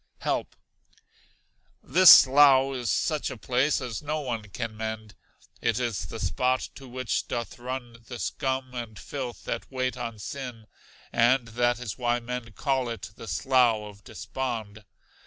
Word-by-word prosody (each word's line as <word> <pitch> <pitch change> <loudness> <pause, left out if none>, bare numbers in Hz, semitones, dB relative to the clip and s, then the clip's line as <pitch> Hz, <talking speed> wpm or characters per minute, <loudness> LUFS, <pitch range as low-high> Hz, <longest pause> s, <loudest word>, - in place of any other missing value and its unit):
Help. - - -2 1.3
This 185 +6 +7
slough 135 0 +8
is 120 -2 -3
such 155 -3 0
a - - -7
place 130 +7 +1
as 125 -5 -5
no 150 +1 -2
one 120 -5 -3
can 115 +2 -5
mend. 110 -1 -5 0.5
It 115 0 +1
is 120 -5 -2
the - - -7
spot 125 - 0
to 135 - -12
which 130 -1 -2
doth 120 -1 -4
run 125 -1 -6
the 120 - -6
scum 130 -1 -2
and 120 -4 -6
filth 125 +1 -6
that 115 - -5
wait 130 -1 -1
on 115 -2 -5
sin, 120 0 -7 0.5
and 120 +1 +3
that 120 +1 +1
is 125 -1 -6
why 120 0 +1
men 120 -1 -6
call 130 0 0
it 115 -3 -6
the 115 - -10
Slough 125 -5 +2 0.2
of - - -29
Despond. 110 -5 -5
125 Hz, 155 wpm, -27 LUFS, 115-130 Hz, 1.3 s, slough